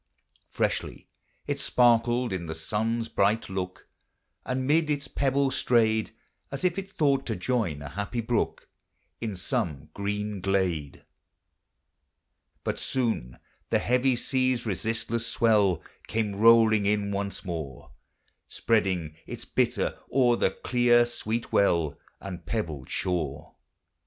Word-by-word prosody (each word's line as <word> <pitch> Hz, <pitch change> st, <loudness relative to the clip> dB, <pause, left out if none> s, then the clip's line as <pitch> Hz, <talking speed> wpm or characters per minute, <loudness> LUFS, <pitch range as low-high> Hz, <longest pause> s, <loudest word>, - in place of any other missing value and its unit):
Freshly -, -, -2 dB, 0.4 s
it -, -, -2 dB
sparkled 120 Hz, -1 st, +3 dB
in 85 Hz, -3 st, -4 dB
the 80 Hz, -, -4 dB
sun's 110 Hz, +7 st, -1 dB
bright 105 Hz, 0 st, +1 dB
look, 90 Hz, -1 st, -5 dB, 0.6 s
And 130 Hz, 0 st, -1 dB
mid 155 Hz, +2 st, +3 dB
its 145 Hz, -1 st, -1 dB
pebbles 135 Hz, 0 st, +1 dB
strayed, 110 Hz, -2 st, +2 dB, 0.4 s
As 140 Hz, +6 st, -3 dB
if 180 Hz, +1 st, +1 dB
it 195 Hz, 0 st, -7 dB
thought 140 Hz, -6 st, +2 dB
to 110 Hz, -, -1 dB
join 90 Hz, -, -1 dB
a 70 Hz, -, -6 dB
happy 100 Hz, -, -3 dB
brook 115 Hz, 0 st, -1 dB, 0.5 s
In 110 Hz, -4 st, -3 dB
some 75 Hz, -4 st, -2 dB
green 105 Hz, 0 st, -3 dB
glade. 90 Hz, -7 st, -1 dB, 1.6 s
But -, -, -2 dB
soon 115 Hz, -, -1 dB, 0.3 s
the -, -, +3 dB
heavy 125 Hz, +1 st, +2 dB
sea's 130 Hz, 0 st, 0 dB
resistless 110 Hz, +3 st, -1 dB
swell 105 Hz, -6 st, +3 dB, 0.2 s
Came 110 Hz, -2 st, -1 dB
rolling 110 Hz, -1 st, +6 dB
in 100 Hz, -1 st, +1 dB
once 100 Hz, 0 st, -3 dB
more, 80 Hz, -7 st, -6 dB, 0.6 s
Spreading 95 Hz, -8 st, 0 dB
its -, -, -7 dB
bitter -, -, 0 dB
o'er 125 Hz, -3 st, +4 dB
the -, -, +2 dB
clear 120 Hz, +3 st, +3 dB
sweet 115 Hz, -1 st, -3 dB
well 85 Hz, -7 st, +2 dB, 0.2 s
And 90 Hz, -3 st, -7 dB
pebbled 80 Hz, -, -3 dB
shore. 75 Hz, -5 st, -2 dB
110 Hz, 120 wpm, -27 LUFS, 95-120 Hz, 1.6 s, rolling